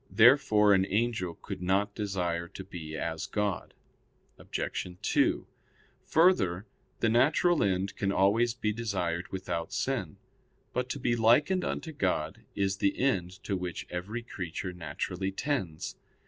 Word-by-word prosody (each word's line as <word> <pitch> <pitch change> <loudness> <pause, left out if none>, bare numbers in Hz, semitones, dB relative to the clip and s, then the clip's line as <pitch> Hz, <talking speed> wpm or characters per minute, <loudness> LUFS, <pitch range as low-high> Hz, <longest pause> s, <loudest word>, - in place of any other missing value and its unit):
Therefore 110 -4 +6
an 95 0 +3
angel 105 -5 0
could - - -6
not 100 +3 +1
desire 90 -5 -2
to 95 - -9
be 80 -5 -7
as 80 -1 -3
God. 105 -4 -2 0.6
Obj. - - -3
2: - - +2 0.6
Further, 105 - +3 0.4
the 115 - +3
natural 150 +8 +4
end 95 0 0
can 100 -1 0
always 110 +5 +3
be 105 -3 -1
desired 95 -6 -2
without 85 -3 -3
sin. - - -2 0.6
But 125 0 -1
to 140 - -3
be 120 -2 +1
likened 120 +11 +4
unto 160 - -3
God 90 - -1
is 100 -1 0
the 100 0 +1
end 95 -10 +1
to 100 - -1
which 90 -2 -4
every 100 +7 -4
creature 90 -3 -5
naturally 90 +3 -3
tends. 95 - -3
100 Hz, 135 wpm, -30 LUFS, 90-115 Hz, 0.6 s, Therefore